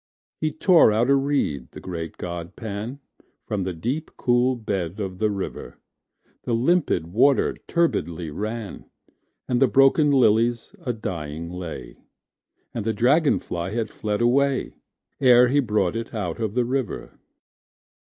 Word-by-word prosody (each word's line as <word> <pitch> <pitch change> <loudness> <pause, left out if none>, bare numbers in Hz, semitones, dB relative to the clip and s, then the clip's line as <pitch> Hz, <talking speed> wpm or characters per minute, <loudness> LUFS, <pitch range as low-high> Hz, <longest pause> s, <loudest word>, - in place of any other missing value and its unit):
He 155 -1 0
tore 165 - +5
out 115 +5 +2
a - - +6
reed, 135 - 0
the - - -8
great 85 -3 -6
god 85 -1 -6
Pan, 110 +4 -5 0.5
From 105 -2 -2
the 95 - -2
deep 125 - -3
cool 125 +1 +2
bed 95 -5 -3
of 95 -3 -4
the 110 -1 +2
river:The 100 - -7
limpid 115 - +1
water 135 +5 +4
turbidly 85 - 0
ran, 110 +5 -5 0.6
And 125 0 0
the 135 - +6
broken 135 +6 +4
lilies 120 -3 +2
a 125 - -1
dying 85 -7 -5
lay, 80 -9 -7 0.8
And 115 - -3
the 110 +1 0
dragon 140 +8 +3
fly 85 +3 -5
had 115 -2 -2
fled 105 +1 -3
away, 135 +3 +2 0.5
Ere 125 -2 +6
he 145 +3 +3
brought 105 -7 +1
it 115 +1 -5
out 90 -5 -3
of 110 -1 -2
the 125 -1 +2
river. 130 -2 -3
115 Hz, 145 wpm, -24 LUFS, 90-130 Hz, 0.8 s, a